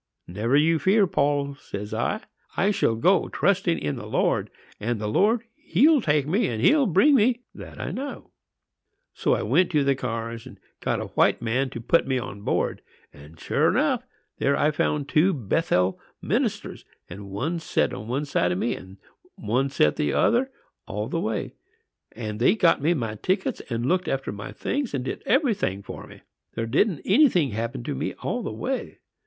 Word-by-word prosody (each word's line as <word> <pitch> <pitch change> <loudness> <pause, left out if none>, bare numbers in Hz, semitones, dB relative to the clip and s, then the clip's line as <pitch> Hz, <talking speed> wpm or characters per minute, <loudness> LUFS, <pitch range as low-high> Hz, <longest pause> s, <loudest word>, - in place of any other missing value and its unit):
"'Never 110 +9 -1
you 160 +2 +3
fear, 195 +6 +4
Paul,' 140 -4 0
says 105 -6 -7
I; 160 - -1 0.4
'I 195 +3 +3
shall 115 - +1
go 180 +11 +3
trusting 185 -3 +1
in 75 -1 -3
the - - -7
Lord; - - 0 0.3
and 115 +1 -2
the 105 - -4
Lord, 215 - +2
He'll 285 - +3
take 145 -6 +2
me, 195 +9 +1
and 115 -3 -3
He'll 280 - +4
bring 200 - +4
me,—that 245 0 0
I - - -3
know.' 280 +2 -6 0.8
"So - - +1
I - - -2
went 185 - +3
to 150 -2 +3
the 140 0 +3
cars 115 -3 -5
and - - -13 0.2
got - - -1
a - - -6
white - - +2
man 125 +4 0
to 120 - -7
put 125 +6 +2
me 130 -1 +1
aboard; 100 -5 -2 0.3
and, 75 +3 -15
sure - - +1
enough, - - +1 0.4
there 140 +1 +2
I 150 - +3
found 150 -1 -1
two 160 +7 +3
Bethel 100 - 0 0.2
ministers; - - -2 0.2
and 100 +2 -9
one 145 - -2
set 165 - 0
one 125 +8 -3
side 90 -11 +1
o' - - 0
me, 120 +6 -1
and 95 +1 -12 0.4
one 125 +6 0
set 75 - +2
the 75 - 0
other, 250 +3 +2 0.4
all 105 +1 -4
the 165 - -1
way; 110 -7 -3 0.6
and 110 -2 -5
they 130 - +4
got 175 -9 +3
me 165 +4 +2
my 115 -7 -2
tickets, 190 +1 -1
and 120 -1 -2
looked 185 +6 +1
after 135 0 -2
my 100 0 -7
things, 275 - -2
and 130 -2 -3
did - - -4
every 265 -1 +3
thing 100 - -3
for - - -9
me. - - -14 0.3
There 115 - -2
didn't 150 - +1
anything 190 - +4
happen 110 - -4
to - - -3
me 65 - -3
all - - -1
the - - -4
way. - - -4
140 Hz, 185 wpm, -25 LUFS, 110-185 Hz, 0.8 s, fear